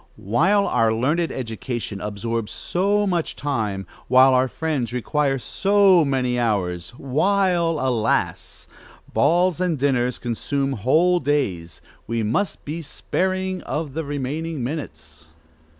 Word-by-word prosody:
While 185 - +2
our 115 -1 +2
learned 150 +9 0
education 115 -3 -5
absorbs 105 +2 -3
so 200 +3 0
much 175 -4 -1
time, 110 -9 -2 0.2
while 130 +1 +6
our 130 +1 +3
friends 145 -4 -2
require 135 +3 0
so 195 +4 +4
many 130 -3 0
hours, 90 -7 -1
while, 170 +3 +1
alas! 125 -4 -1 0.5
balls 175 +4 +2
and 175 -4 +1
dinners 125 -3 +1
consume 135 +4 -2
whole 160 - +3
days, 105 - -1 0.3
we 115 0 -1
must 155 - -1
be 155 +3 -4
sparing 185 +4 -2
of 150 +2 -4
the 160 +2 -3
remaining 145 +1 -3
minutes. 80 - -7
135 Hz, 120 wpm, -22 LUFS, 115-165 Hz, 0.5 s, while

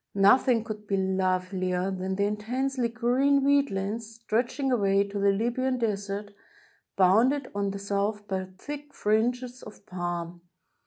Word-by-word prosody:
Nothing 225 +4 +5
could 210 -1 -7
be 195 - 0
lovelier 185 0 0
than 190 0 -3
the 200 - 0
intensely 245 +4 -1
green 255 +4 +2
wheat 280 0 +3
lands, 215 +4 -4
stretching 240 +4 -1
away 200 -4 +3
to 200 0 -4
the 200 0 +3
Libyan 240 +5 0
Desert, 205 -2 -3 0.6
bounded 235 +9 +3
on 200 0 -1
the 195 - -4
south 200 +1 -2
by 190 -1 -2
thick 290 +5 -8
fringes 245 +4 0
of 210 -1 -13
palm. 175 -2 -4
210 Hz, 140 wpm, -27 LUFS, 195-245 Hz, 0.6 s, Nothing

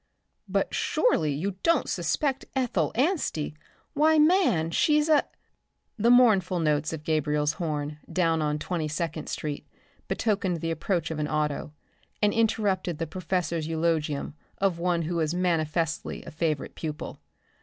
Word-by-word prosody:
"But - - 0
surely 160 - +2
you 180 +7 -3
don't 335 -4 +2
suspect 265 - -1
Ethel 230 - +1
Anstey. 260 - 0 0.4
Why, 315 +1 +4
man, 305 - +4
she's 300 - +3
a" 305 -2 +5 0.7
The 230 +1 +2
mournful 210 -8 +5
notes 150 -1 +1
of 160 -2 -5
a - - -26
Gabriel's 150 -1 +1
horn 150 -2 -3
down 165 -3 +2
at 150 0 0
Twenty 165 -1 -2
second 155 0 -3
street 150 -2 -4 0.4
betokened 195 -5 0
the 165 - -1
approach 165 0 -1
of 155 - -3
an 150 - 0
auto, 150 0 -2 0.5
and 210 -1 +3
interrupted 205 -6 +1
the 165 - -2
professor's 170 -1 -2
eulogium 160 -3 -1 0.2
of 190 -4 +1
one 175 -1 +1
who 170 +2 -2
was 160 0 0
manifestly 165 -2 -1
a - - -8
favorite 155 -2 -2
pupil. 155 -2 -6
165 Hz, 145 wpm, -27 LUFS, 155-200 Hz, 0.7 s, a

